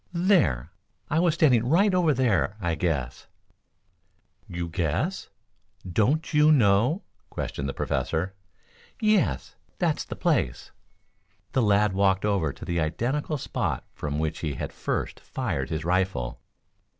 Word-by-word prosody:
"There! 170 - +2 0.4
I 155 - +3
was 170 -2 +3
standing 130 -9 +4
right 195 +6 +4
over 175 -4 +3
there 120 -6 +1
I 85 -4 -1
guess." 75 -8 -2 1.2
"You 85 -1 -4
guess! 90 - -2 0.6
Don't 125 - +1
you 150 +1 +6
know?" 125 - +3 0.3
questioned 70 -1 -4
the - - -3
Professor. 90 +4 -1 0.7
"Yes; 205 - +1 0.2
that's - - 0
the - - -7
place." - - 0 0.8
The 130 - +2
lad 105 -2 +3
walked 95 0 +2
over 95 -8 +1
to - - -10
the 85 0 -1
identical 130 - -1
spot - - -2
from 75 -1 -4
which 80 +1 -2
he 75 -4 -3
had - - -5
first - - -3
fired 70 +1 -3
his 80 -1 -3
rifle. 90 -9 0
100 Hz, 130 wpm, -26 LUFS, -, 1.2 s, you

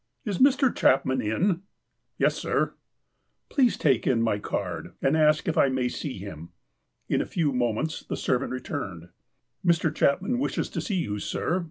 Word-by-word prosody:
''Is 200 -5 -2
Mr. 270 -1 +4
Chapman 130 -1 +3
in?" 165 - 0 0.6
"Yes, - - +3
sir." - - 0 0.4
" - - -49
Ph';us(^ 255 -5 +3
take 135 -6 +2
in 125 -3 +3
my 115 -3 +1
card, - - -4
and 135 +3 +2
ask 155 -1 +3
if 165 - +1
I 140 - +5
may 130 -1 0
see 135 0 -5
him." 85 -4 -8 0.6
In - - +1
a - - -2
few 155 -5 0
moments 125 +5 -1
the - - -5
servant 130 +1 0
returned. 100 - -5 0.5
"Mr. 170 -3 +2
Cluipmau 195 - +1
wishes 275 - -1
to - - -3
see 205 - -2
you, 105 -9 -2
sir. 175 - -1
140 Hz, 170 wpm, -26 LUFS, 120-170 Hz, 0.6 s, I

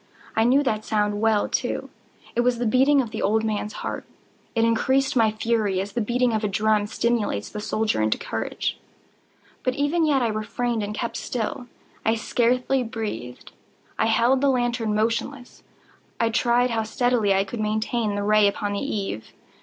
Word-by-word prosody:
I 220 - +3
knew 270 +4 +4
that 215 -5 -1
sound 210 -1 0
well, 220 -2 +3
too. - - -2 0.4
It 240 - +3
was 245 0 +2
the 240 - -2
beating 265 +5 +4
of 225 - -8
the - - -4
old 220 +2 +2
man's 215 -1 -2
heart. - - -3 0.5
It 225 0 +3
increased 265 +4 +2
my 225 -3 +4
fury, 215 -3 0
as 195 +2 -3
the 240 - 0
beating 240 +2 +1
of 220 0 -1
a - - +2
drum 210 +1 +1
stimulates 225 - -1
the 210 - -6
soldier 215 - 0
into 110 0 +1
courage. - - -3 0.8
But 255 - -1
even 290 +4 +1
yet 285 -5 +3
I 230 - +1
refrained 220 +2 -2
and 210 +1 -4
kept 235 +2 -3
still. 245 +1 -3 0.4
I 225 - +2
scarcely 250 +3 +1
breathed. 215 - -6 0.5
I 220 - +3
held 235 +4 +3
the 280 - +4
lantern 240 -4 0
motionless. 235 +4 -2 0.6
I 230 - +2
tried 240 +2 +2
how 225 -1 0
steadily 220 -1 +1
I 195 - +3
could 210 +4 -7
maintain 215 0 -1
the 205 - -2
ray 210 0 +5
upon 205 0 -2
the 200 - -1
eve. 200 - -4
225 Hz, 175 wpm, -24 LUFS, 210-245 Hz, 0.8 s, ray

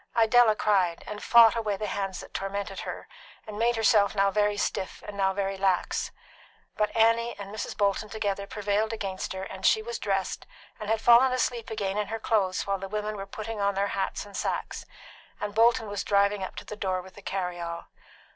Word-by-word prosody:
Idella 225 -1 +5
cried, 190 -6 +1
and 210 0 -7
fought 235 -1 +7
away 215 -3 -1
the 210 - -3
hands 195 -2 -3
that - - -13
tormented 195 0 -4
her, - - -6 0.4
and 210 -1 -7
made 235 +1 +2
herself 215 -2 +3
now 195 0 +3
very 210 0 +1
stiff 190 - -3
and 205 - -7
now 195 -1 +2
very 195 0 -2
lax; 190 -2 0 0.7
but 210 0 +1
Annie 230 +1 +3
and 200 0 -8
Mrs. 215 - -5
Bolton 205 +1 +1
together 200 -2 -2
prevailed 210 +2 -1
against 195 -4 -4
her, 190 0 -5
and - - -8
she 440 - +4
was 470 +1 -5
dressed, - - -2 0.3
and 215 -1 -5
had 225 0 +1
fallen 240 +3 +6
asleep 245 -2 -1
again 205 -2 -2
in 210 - -1
her 225 +2 -4
clothes 195 -5 0
while 195 -1 -1
the 195 0 -6
women 210 +1 -3
were 195 -1 -6
putting 215 +1 -5
on 200 0 +1
their 200 +1 0
hats 195 +1 -2
and 200 -1 -12
sacks, - - -3 0.5
and 210 0 -4
Bolton 230 +1 +4
was 205 -1 -3
driving 200 0 +2
up - - -6
to - - -8
the 210 - -7
door 190 -3 -1
with 190 - -14
the 205 - -13
carry 180 -3 -3
all. 170 0 -5
205 Hz, 205 wpm, -27 LUFS, 195-220 Hz, 0.7 s, fought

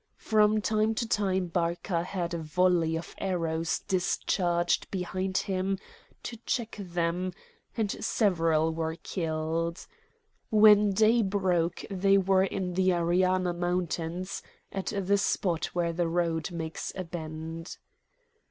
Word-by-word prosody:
From 215 0 +3
time 215 +1 +1
to 230 0 -1
time 190 -4 +1
Barca 170 +1 -1
had 175 -2 -3
a 170 - -2
volley 165 0 +2
of 165 - -8
arrows 165 -3 -1
discharged 175 -1 +1
behind 185 0 -2
him 190 0 0 0.5
to 235 - -6
check 230 0 -3
them, 175 0 -2 0.4
and 215 -3 0
several 165 -6 +2
were 160 0 -2
killed. 165 0 -2 0.6
When 210 -1 +7
day 220 +4 +4
broke 185 -4 0
they 195 +1 +3
were 190 0 +3
in 185 -2 -3
the 185 +1 +2
Ariana 180 +1 +2
Mountains, 175 0 -2 0.3
at 195 -1 -4
the 200 -1 +1
spot 175 -4 0
where 170 -1 -1
the 170 0 0
road 165 0 0
makes 160 -2 -4
a 185 - -3
bend. 165 0 -6
180 Hz, 125 wpm, -29 LUFS, 170-195 Hz, 0.6 s, When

